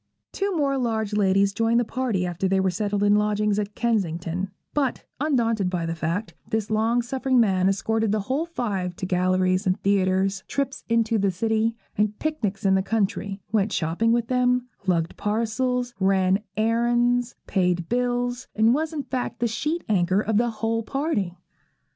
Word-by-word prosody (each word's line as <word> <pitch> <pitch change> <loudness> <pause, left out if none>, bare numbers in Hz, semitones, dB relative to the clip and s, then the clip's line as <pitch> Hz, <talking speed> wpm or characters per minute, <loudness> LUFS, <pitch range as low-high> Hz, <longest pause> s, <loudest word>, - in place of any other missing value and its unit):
Two 395 -2 -1
more 275 -2 +1
large 220 -4 -1
ladies 195 -1 +3
joined 230 +2 +2
the 240 - +1
party 220 -7 -1
after 175 +2 -1
they 190 0 +2
were 190 -1 +2
settled 205 +2 -1
in 205 0 +5
lodgings 210 0 +1
at 205 0 -4
Kensington; 185 -5 -1 0.2
but, 275 -4 -1
undaunted 230 -9 +1
by 175 -2 -2
the 165 - -2
fact, 165 +6 -3 0.2
this 220 -2 -1
long 225 +3 +2
suffering 260 +1 +1
man 190 -4 +3
escorted 220 +2 0
the 215 0 +1
whole 270 +10 -1
five 195 - -3
to 185 - -4
galleries 185 +1 +1
and 185 - +1
theatres, 195 -1 +1
trips 275 -1 -2
into 230 -1 +2
the 200 0 +2
city, 220 +4 0 0.2
and 210 0 +1
picnics 215 -12 -2
in 190 - +4
the 190 - +3
country; 200 -1 -2
went 210 -1 +1
shopping 175 +8 +1
with 235 0 +2
them, 250 0 +1 0.2
lugged 170 -2 +1
parcels, 240 +4 -1
ran 190 0 +3 0.2
errands, 240 +2 +2
paid 180 -3 0
bills, 245 +1 -1
and 220 +2 +4
was 315 +3 -1
in 295 -3 -3
fact 250 -3 -3
the 240 - 0
sheet 300 +9 -2
anchor 185 -2 +2
of 215 -1 0
the 240 +1 +2
whole 225 0 -1
party. 225 - -2
215 Hz, 170 wpm, -24 LUFS, 190-240 Hz, 0.2 s, in